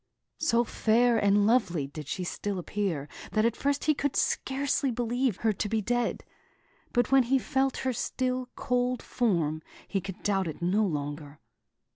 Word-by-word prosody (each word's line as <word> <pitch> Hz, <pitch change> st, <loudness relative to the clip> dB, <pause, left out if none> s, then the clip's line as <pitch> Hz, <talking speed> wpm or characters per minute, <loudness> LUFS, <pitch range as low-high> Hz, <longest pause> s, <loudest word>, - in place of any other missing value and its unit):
So 240 Hz, -7 st, +3 dB
fair 230 Hz, +1 st, +3 dB
and 205 Hz, 0 st, +4 dB
lovely 205 Hz, -, +2 dB
did 145 Hz, +1 st, -8 dB
she 185 Hz, -, -3 dB
still 200 Hz, +2 st, -3 dB
appear 180 Hz, -5 st, -2 dB, 0.3 s
that 215 Hz, 0 st, +3 dB
at 230 Hz, -1 st, +2 dB
first 285 Hz, 0 st, 0 dB
he 305 Hz, -, +4 dB
could 285 Hz, -1 st, -2 dB
scarcely 275 Hz, 0 st, 0 dB
believe 245 Hz, -1 st, 0 dB
her 220 Hz, -1 st, +1 dB
to 205 Hz, +2 st, -3 dB
be 225 Hz, -, +1 dB
dead; 240 Hz, +2 st, -1 dB, 0.7 s
but 245 Hz, +1 st, +1 dB
when 270 Hz, 0 st, +7 dB
he 255 Hz, +2 st, +2 dB
felt 265 Hz, 0 st, 0 dB
her 260 Hz, -, +1 dB
still, 255 Hz, +1 st, -2 dB
cold 250 Hz, 0 st, 0 dB
form, 165 Hz, -10 st, 0 dB, 0.3 s
he 195 Hz, -, -1 dB
could 190 Hz, -1 st, -8 dB
doubt 195 Hz, -3 st, +1 dB
it 155 Hz, -, -6 dB
no 185 Hz, +5 st, +2 dB
longer. 145 Hz, -2 st, -5 dB
225 Hz, 165 wpm, -28 LUFS, 185-250 Hz, 0.7 s, when